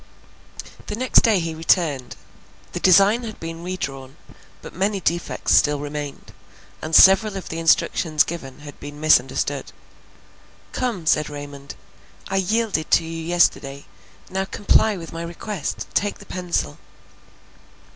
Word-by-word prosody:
The - - -3
next 255 +3 +4
day 220 -4 +3
he 165 -1 -3
returned. 160 -5 0 0.6
The 175 - -4
design 195 +6 +5
had 220 -3 -8
been 165 0 -7
re 185 +1 -4
drawn; 135 -3 -6 0.5
but - - -10
many 195 +2 -1
defects 170 -1 -1
still 145 -1 +3
remained, 145 -1 -7 0.5
and 155 0 -2
several 195 +1 +6
of 190 - -8
the 165 - -4
instructions 160 -1 +2
given 145 -5 -8
had 145 -1 -11
been 145 0 -9
misunderstood. 135 -4 +1 1.0
"Come," 230 -10 -3
said 155 0 +2
Raymond, 145 -1 -9 0.5
"I 195 - -1
yielded 200 -4 0
to - - +4
you 165 0 -6
yesterday, 155 -5 +1 0.4
now 190 +1 -2
comply 205 +1 +2
with 165 -2 -9
my 165 - -5
request—take 190 +3 -3
the - - -14
pencil." 175 - -3
165 Hz, 135 wpm, -22 LUFS, 145-195 Hz, 1.0 s, several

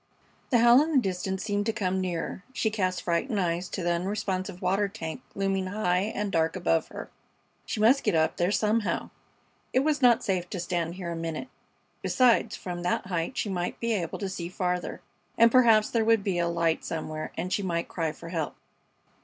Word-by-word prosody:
The 250 - +4
howl 240 +3 +7
in 320 +1 -1
the - - +4
distance 190 -3 -1
seemed 205 0 -1
to - - +3
come 190 -3 -1
nearer. 180 +1 -3
She 220 -3 0
cast 185 -4 -1
frightened 200 +6 0
eyes 175 0 -1
to 185 - -4
the 175 - +1
unresponsive 185 +1 -2
water 195 +3 +1
tank 165 0 -6
looming 195 -1 0
high 190 0 0
and 205 -1 -2
dark 165 -1 +1
above 170 -3 +1
her. - - -9 0.6
She - - -3
must 245 +6 +5
get - - +1
up 160 0 +2
there 175 +1 +2
somehow. 215 +1 0 0.6
It 260 - +4
was 295 0 +1
not 245 -2 +5
safe 180 -2 -1
to 185 - -4
stand 170 -1 -2
here 180 -2 -5
a - - -3
minute. 165 +7 -4 0.5
Besides, 250 -2 +3
from 175 -1 -6
that 175 +1 0
height 180 +6 -2
she - - 0
might 180 -2 -3
be 230 -1 0
able 175 -6 -2
to 200 - -3
see 175 -2 -5
farther, 180 -1 -2 0.4
and 230 0 +6
perhaps 225 -4 +5
there 230 -2 +2
would 225 -2 +3
be 190 -3 0
a 170 - +1
light 170 -1 0
somewhere 155 -1 -4
and 180 +3 -2
she - - +1
might 170 -3 -1
cry 165 -3 -2
for 165 - -10
help. 165 -3 -3
185 Hz, 200 wpm, -27 LUFS, 175-215 Hz, 0.6 s, howl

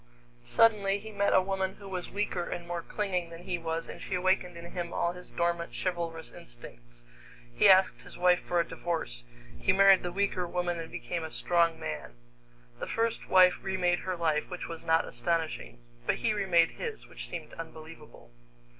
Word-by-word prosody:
Suddenly 200 - +4
he 220 +2 -9
met 200 -1 +1
a 185 - +5
woman 190 0 -1
who 200 - -12
was 185 -2 -4
weaker 195 -4 -2
and 175 -1 -5
more 175 -1 -3
clinging 180 -3 -2
than 165 +1 -10
he 180 -2 -2
was, 165 0 -3
and - - -9
she 190 - -3
awakened 180 -1 +1
in 170 0 -9
him 175 -1 -4
all 170 - 0
his 180 0 -11
dormant 170 0 -1
chivalrous 170 -3 -3
instincts. - - -12 0.5
He - - +5
asked 190 0 +5
his - - -12
wife 180 0 +4
for 175 - 0
a 170 - +1
divorce. 110 - -3 0.4
He - - +3
married 195 0 +7
the 175 - -3
weaker 185 -1 0
woman 175 0 -1
and 165 0 -6
became 170 -2 -4
a 160 - -4
strong 170 -1 +2
man. - - -5 0.6
The - - -4
first 230 0 -1
wife 185 -1 +6
remade 185 -2 +1
her 185 -1 -3
life, 160 -3 0
which 180 -1 -5
was 165 -1 -7
not 160 0 +3
astonishing; 165 - -2 0.3
but - - +3
he - - 0
remade 180 -5 +3
his, 450 -3 -6
which - - -7
seemed - - -7
unbelievable. 160 - -11
175 Hz, 185 wpm, -30 LUFS, 165-190 Hz, 0.6 s, married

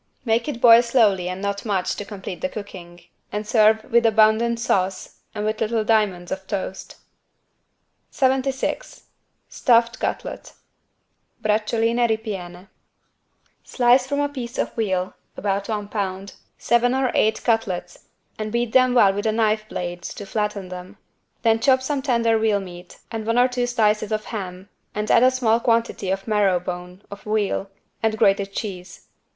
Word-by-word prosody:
Make 230 +2 +1
it 240 - -4
boil 235 -1 +8
slowly 215 -7 +2
and 185 +2 -5
not 200 0 -2
much 195 -5 -1
to 205 - -6
complete 195 -3 -8
the 275 - -1
cooking 180 -6 -9 0.3
and 210 +1 -3
serve 220 0 +4
with 235 0 +2
abundant 225 +1 +3
sauce 190 -4 -1 0.2
and 210 0 -3
with 215 0 -2
little 225 0 0
diamonds 210 -5 +1
of 190 0 -5
toast. 190 -1 -5 1.1
76 265 - -1 0.4
STUFFED 235 -2 +2
CUTLET - - -4 0.9
(Braciuoline 225 +2 +1
ripiene) 195 -4 -4 0.9
Slice 250 +1 +3
from 285 +1 -1
a 290 - +1
piece 255 -4 -7
of - - -1
veal 190 -5 -1 0.2
(about 200 0 -2
one 210 -2 -3
pound) 195 -2 -4 0.2
seven 240 +2 +2
or 265 -1 +1
eight 220 +1 +1
cutlets 190 -7 -1 0.3
and 215 0 -3
beat 235 0 -1
them 255 0 +4
well 200 -5 +5
with 205 +2 -2
a - - +3
knife 215 -1 0
blade 175 0 -5
to 205 - -7
flatten 210 -2 -3
them. 180 0 -9 0.5
Then 225 -1 +3
chop 260 +1 +3
some 280 0 -1
tender 230 -4 +2
veal 215 -2 +2
meat 180 -2 -11
and 225 -1 -4
one 230 +2 0
or 245 +1 +5
two 250 -1 -2
slices 215 -3 +1
of 215 0 -2
ham 190 -3 -6 0.3
and 210 0 -1
add - - +6
a 255 - +6
small 240 -3 +1
quantity 230 -5 0
of 195 +2 -2
marrow 205 -4 +2
bone 180 +1 -7
(of 200 - -9
veal) 210 -2 -1 0.3
and 220 -1 0
grated 195 -1 +2
cheese. 185 -4 -7
215 Hz, 155 wpm, -22 LUFS, 195-235 Hz, 1.1 s, boil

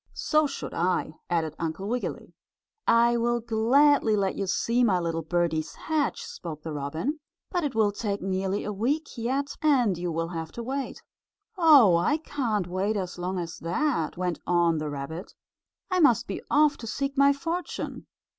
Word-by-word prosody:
"So 305 -1 +2
should 275 - -6
I," 175 -2 0 0.2
added 165 -3 0
Uncle 165 +4 -3
Wiggily. 245 +3 -4 0.5
"I 235 +1 +5
will 240 +1 +1
gladly 235 +2 +3
let 195 -2 +1
you 195 - -2
see 235 +5 +1
my 200 -6 +3
little 165 -1 -2
birdies 160 -1 -1
hatch," 310 -4 -1
spoke 155 -3 -8
the 160 - -5
robin, 160 - -3 0.3
"but 355 -2 0
it 280 -5 -2
will 215 -2 +3
take 205 -1 -3
nearly 190 +1 -1
a 210 - -3
week 275 +10 -1
yet, 270 +4 -2
and 255 -10 +3
you 175 -1 -2
will 165 +1 -2
have 165 -2 -5
to 235 - -5
wait." 270 +3 -4 0.5
"Oh, 290 - +7
I 295 - +2
can't 240 - -2
wait 190 +4 -1
as 180 -2 -4
long 185 +2 -2
as 170 -1 -5
that," 170 - -1
went 180 -2 -2
on 170 -2 +3
the 155 0 -3
rabbit. 145 +5 -6 0.6
"I 370 - +2
must 245 - +4
be - - -5
off 295 0 +4
to 230 - -8
seek 275 +4 -2
my 280 0 +6
fortune." 335 +5 -4
210 Hz, 175 wpm, -27 LUFS, 175-275 Hz, 0.6 s, Oh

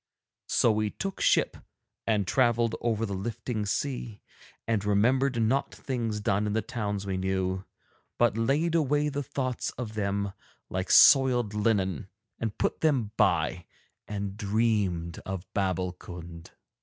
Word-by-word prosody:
So 115 - +3
we 110 0 0
took 195 - -5
ship - - +3 0.5
and 105 -3 +2
travelled 120 0 +2
over 115 -1 0
the 100 - -4
lifting 110 +2 -3
sea, 120 -2 -3 0.4
and 110 -3 +1
remembered 120 +6 +2
not 115 +5 +1
things 115 -5 -3
done 105 0 +1
in 105 - -1
the 110 - 0
towns 105 -4 -3
we 95 -1 -2
knew, 95 0 -1 0.5
but 120 -3 +3
laid 140 +9 +1
away 150 -2 +2
the 145 0 -3
thoughts 130 -2 -3
of 115 -3 -5
them 100 -1 -1 0.4
like 95 0 -2
soiled 125 -6 +6
linen 100 - 0 0.3
and 110 -2 -3
put - - -1
them 130 -9 +2
by, 90 -4 +1 0.4
and 100 -1 -4
dreamed 100 -6 0
of 95 -1 -5
Babbulkund. 90 -3 -4
105 Hz, 135 wpm, -28 LUFS, 100-120 Hz, 0.5 s, soiled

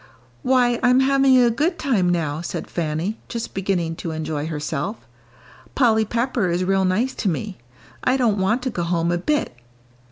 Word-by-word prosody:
"Why, 250 -2 +2
I'm 250 +1 +4
having 270 -1 +4
a 240 -2 +5
good 315 +9 0
time 215 -11 +1
now," 160 -3 -1
said 175 - -5
Fanny, 170 +6 -3
just 235 -1 -5
beginning 180 -4 -1
to 170 - -5
enjoy 155 -1 -3
herself. 160 +6 -4 0.7
"Polly 220 -4 +3
Pepper 235 -3 0
is 175 +2 0
real 190 +1 +2
nice 220 +8 +1
to 200 - -1
me. 190 +3 -4 0.4
I 255 +1 +2
don't 225 -6 +1
want 220 +7 +1
to 255 - -1
go 175 - -3
home 170 0 0
a 175 - 0
bit." 295 - -1
200 Hz, 170 wpm, -22 LUFS, 170-250 Hz, 0.7 s, a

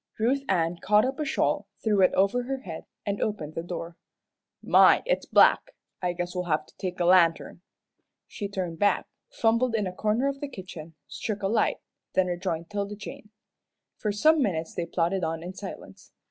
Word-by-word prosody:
Ruth 250 +5 +1
Ann 170 -2 +1
caught 210 +3 +4
up 265 +2 -3
a 305 - -1
shawl, 275 - 0 0.2
threw 210 -3 +3
it 185 - +5
over 200 +6 +3
her 270 +1 -3
head, 165 -7 -8 0.2
and 200 0 -2
opened 160 -8 -2
the 165 - -3
door. 170 -1 -6 0.7
"My - - +6
it's - - 0
black! - - +4 0.3
I 180 -1 0
guess 175 0 -4
we'll 180 -1 -2
have 155 -2 0
to - - -23
take 180 -1 -4
a 175 - +1
lantern." 175 -1 +3 0.6
She 205 - -5
turned 180 -4 -4
back, 205 -2 +2 0.2
fumbled 230 +1 +1
in 210 -2 0
a 185 - -4
corner 215 +7 0
of 275 0 -2
the 290 - -4
kitchen, 170 - -9
struck 205 +6 -4
a - - +2
light, 215 +2 +1 0.3
then 185 - +3
rejoined 175 -1 -3
'Tilda 205 0 -3
Jane. 210 0 -10 0.7
For 210 - -2
some 310 +10 +4
minutes 165 -9 -1
they 170 - -3
plodded 175 +2 0
on 165 0 -2
in 180 +2 -6
silence. 195 0 -10
190 Hz, 190 wpm, -27 LUFS, 175-215 Hz, 0.7 s, My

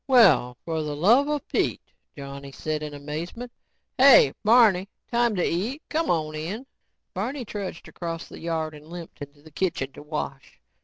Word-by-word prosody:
"Well, 175 - +5
for 160 -1 -1
the 150 -1 -3
luvva 265 - +4
Pete," - - -1 0.2
Johnny 140 0 -8
said 155 +2 -3
in 150 -1 -6
amazement. 165 +12 -6 0.5
"Hey, 260 - +8
Barney, 210 -4 +5 0.2
time 235 -2 +2
to 180 - +1
eat. 230 - -2
C'mon 170 - 0
in." 180 - -5 0.5
Barney 245 +7 -3
trudged 200 -5 -6
across 165 -1 -5
the - - -11
yard 160 -2 -2
and 150 0 -13
limped 170 -2 -10
into 145 0 -10
the 155 - -15
kitchen 150 -5 -1
to - - -11
wash. 150 -2 -6
170 Hz, 155 wpm, -25 LUFS, 150-225 Hz, 0.5 s, Hey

